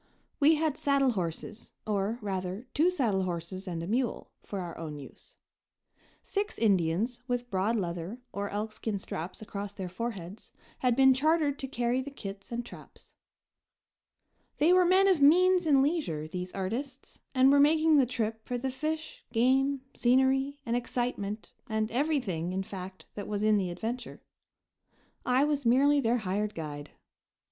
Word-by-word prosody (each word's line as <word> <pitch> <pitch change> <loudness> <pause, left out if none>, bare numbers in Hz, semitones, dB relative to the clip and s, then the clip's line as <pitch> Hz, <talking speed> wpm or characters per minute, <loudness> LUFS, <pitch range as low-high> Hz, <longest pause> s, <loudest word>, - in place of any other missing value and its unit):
We 310 +2 +6
had 310 -2 0
saddle 280 -2 +2
horses, 185 +2 -5
or, 210 +1 -1
rather, 190 +2 -3
two 325 +4 +4
saddle 235 - +1
horses 185 +1 -4
and 170 -2 -3
a - - -5
mule, 240 +3 -1
for 200 - -6
our 175 -2 -5
own 155 -2 -6
use. 140 - -13 0.9
Six 410 +1 -2
Indians, 200 +3 +1
with 245 -1 -2
broad 195 +4 +1
leather 175 +2 -3
or 200 0 -3
elkskin 215 0 -3
straps 180 +2 -6
across 200 -1 -6
their 190 -3 -5
foreheads, 195 -1 -6 0.3
had 250 -2 +2
been 265 0 +6
chartered 295 +1 +2
to 270 - -3
carry 245 0 0
the 275 - -6
kits 195 -7 -9
and 235 0 -3
traps. - - -14 1.4
They 325 +4 +5
were 365 0 +5
men 375 +2 +5
of 370 -6 +3
means 360 +4 +5
and 275 -3 +5
leisure, 275 - -1
these 180 +2 -5
artists, 250 +8 -5 0.2
and 260 +1 +6
were 285 - +5
making 310 +1 +5
the 260 - +3
trip 225 -2 -2
for 245 - -1
the 260 +2 -2
fish, 310 +4 -4
game, 265 +3 +2
scenery 265 +3 +2
and 235 - 0
excitement 240 -4 -3 0.2
and 220 0 -1
everything, 240 - 0
in 190 +1 -1
fact, 190 -1 -8
that 205 - -6
was 205 0 -2
in 215 -1 +4
the 185 -2 -1
adventure. 230 +7 -5 1.0
I 255 +2 +4
was 295 -1 0
merely 275 +5 +4
their 240 -2 +2
hired 210 0 -2
guide. 150 -2 -6
235 Hz, 155 wpm, -29 LUFS, 195-275 Hz, 1.4 s, We